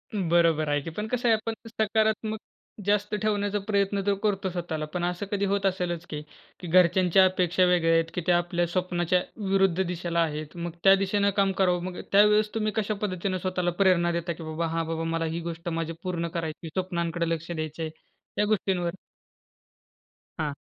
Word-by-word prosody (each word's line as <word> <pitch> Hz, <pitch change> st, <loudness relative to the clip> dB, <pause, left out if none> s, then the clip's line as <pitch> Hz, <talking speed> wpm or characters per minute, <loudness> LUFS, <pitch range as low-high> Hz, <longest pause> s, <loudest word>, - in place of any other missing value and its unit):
बरोबर 165 Hz, -5 st, +2 dB
आहे 145 Hz, 0 st, +1 dB
की. 165 Hz, -, -6 dB
पण 210 Hz, +7 st, -4 dB
कसं 245 Hz, +1 st, -1 dB
आहे 225 Hz, -, +6 dB
आपण 225 Hz, +1 st, -3 dB, 0.2 s
सकारात्मक 220 Hz, 0 st, 0 dB, 0.5 s
जास्त 205 Hz, +1 st, +1 dB
ठेवण्याचा 205 Hz, -1 st, 0 dB
प्रयत्न 200 Hz, -1 st, +1 dB
तर 200 Hz, -, +3 dB
करतो 195 Hz, -2 st, 0 dB
स्वतःला, 170 Hz, -3 st, -3 dB
पण 175 Hz, +3 st, -4 dB
असं 175 Hz, +2 st, -2 dB
कधी 200 Hz, 0 st, 0 dB
होत 200 Hz, 0 st, 0 dB
असेलच 175 Hz, -3 st, -1 dB
की 150 Hz, -1 st, -4 dB, 0.4 s
की 180 Hz, -, -7 dB
घरच्यांच्या 180 Hz, +1 st, +5 dB
अपेक्षा 185 Hz, -1 st, +2 dB
वेगळ्या 175 Hz, -2 st, +3 dB
आहेत 165 Hz, 0 st, +2 dB
की 180 Hz, -, -2 dB
त्या 175 Hz, -1 st, +5 dB
आपल्या 175 Hz, 0 st, 0 dB
स्वप्नाच्या 180 Hz, 0 st, 0 dB, 0.3 s
विरुद्ध 190 Hz, -2 st, +3 dB
दिशेला 170 Hz, -1 st, -2 dB
आहेत. 155 Hz, -1 st, -2 dB
मग 170 Hz, 0 st, -4 dB
त्या 195 Hz, 0 st, +8 dB
दिशेनं 200 Hz, +1 st, +1 dB
काम 195 Hz, -1 st, +3 dB
करावं. 180 Hz, -2 st, +2 dB
मग 180 Hz, -1 st, -5 dB
त्यावेळेस 210 Hz, +1 st, +5 dB
तुम्ही 215 Hz, -1 st, 0 dB
कशा 215 Hz, -1 st, 0 dB
पद्धतीनं 185 Hz, -2 st, -1 dB
स्वतःला 180 Hz, -1 st, -1 dB
प्रेरणा 175 Hz, -2 st, +4 dB
देता 170 Hz, 0 st, -2 dB
की 165 Hz, -, -10 dB
"बाबा, 160 Hz, +1 st, -2 dB
हां 165 Hz, 0 st, -1 dB
बाबा, 165 Hz, 0 st, -2 dB
मला 165 Hz, 0 st, -1 dB
ही -, -, -2 dB
गोष्ट 170 Hz, +1 st, -5 dB
माझी 165 Hz, 0 st, -2 dB
पूर्ण 175 Hz, -2 st, -2 dB
करायची, 160 Hz, 0 st, -4 dB
स्वप्नांकडं 170 Hz, -2 st, -1 dB
लक्ष 165 Hz, +1 st, -3 dB
द्यायचं 155 Hz, 0 st, -4 dB
आहे," 160 Hz, -, -2 dB, 0.5 s
या 210 Hz, -, +4 dB
गोष्टींवर 190 Hz, -4 st, 0 dB, 1.5 s
हां. 150 Hz, -2 st, -1 dB
180 Hz, 180 wpm, -27 LUFS, 165-200 Hz, 1.5 s, त्या